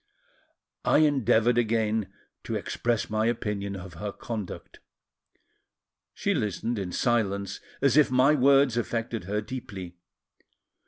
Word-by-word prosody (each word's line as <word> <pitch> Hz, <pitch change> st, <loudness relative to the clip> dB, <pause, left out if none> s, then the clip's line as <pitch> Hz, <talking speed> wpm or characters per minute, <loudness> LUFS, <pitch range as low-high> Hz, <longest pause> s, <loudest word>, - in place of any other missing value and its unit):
I -, -, +4 dB
endeavoured 120 Hz, -4 st, +3 dB
again 110 Hz, -2 st, 0 dB, 0.3 s
to -, -, -3 dB
express 120 Hz, -2 st, -1 dB
my 110 Hz, +1 st, 0 dB
opinion 105 Hz, -4 st, -2 dB
of 95 Hz, -1 st, -8 dB
her 100 Hz, +5 st, -5 dB
conduct; 105 Hz, -3 st, -7 dB, 1.3 s
she -, -, -1 dB
listened 105 Hz, +2 st, -2 dB
in 95 Hz, -2 st, -4 dB
silence, 100 Hz, -3 st, 0 dB, 0.2 s
as 140 Hz, +1 st, +4 dB
if 150 Hz, -, +6 dB
my 130 Hz, +3 st, +4 dB
words 135 Hz, -3 st, +4 dB
affected 115 Hz, -3 st, -2 dB
her 105 Hz, +3 st, -1 dB
deeply. 100 Hz, -7 st, -7 dB
110 Hz, 115 wpm, -27 LUFS, 100-120 Hz, 1.3 s, if